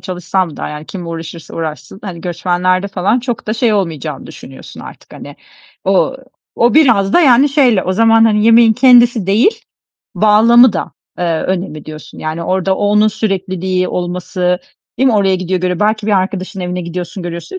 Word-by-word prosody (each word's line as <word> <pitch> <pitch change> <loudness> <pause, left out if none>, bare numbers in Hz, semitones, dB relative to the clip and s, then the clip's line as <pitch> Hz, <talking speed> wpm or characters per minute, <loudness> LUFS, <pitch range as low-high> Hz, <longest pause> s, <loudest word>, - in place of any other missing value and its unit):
çalışsam 180 -2 -3
da - - -5
yani 150 +1 -8
kim 180 -3 -8
uğraşırsa 165 0 -8
uğraşsın, 160 +2 -6
hani, 180 -4 -7
göçmenlerde 180 +2 -1
falan 200 +5 0
çok 240 -2 -5
da 215 - -2
şey 230 -1 +1
olmayacağını 165 -9 -3
düşünüyorsun 65 -1 -12
artık. - - -13
Hani, - - -11 0.5
ooo, 195 0 +1 0.4
o 240 +1 +2
biraz 230 -10 +3
da - - +5
yani 270 -2 +5
şeyle 260 -9 +2
o 185 - -1
zaman, 225 +2 +4
hani, 210 -1 +2
yemeğin 230 0 +6
kendisi 240 -3 +4
değil, 220 - +1 0.5
bağlamı 225 +3 +5
da, 180 - -4 0.3
eee, 180 - -2 0.2
önemli 180 -5 -4
diyorsun. 155 0 -11
Yani, 155 +2 -4
orada 190 +2 -1
o 205 - -1
onun 210 +1 +3
sürekliliği 190 -3 -2
olması, 180 0 -2 0.4
değil 265 - +2
mi? 235 - +1
Oraya 195 -2 +2
gidiyor, 185 0 -3
görüyor. 180 -1 -2
Belki 215 0 0
bir 215 - +1
arkadaşının 185 0 -4
evine 180 0 -4
gidiyorsun, 175 +2 -6
görüyorsun. 170 - -7
190 Hz, 170 wpm, -14 LUFS, 180-220 Hz, 0.5 s, yemeğin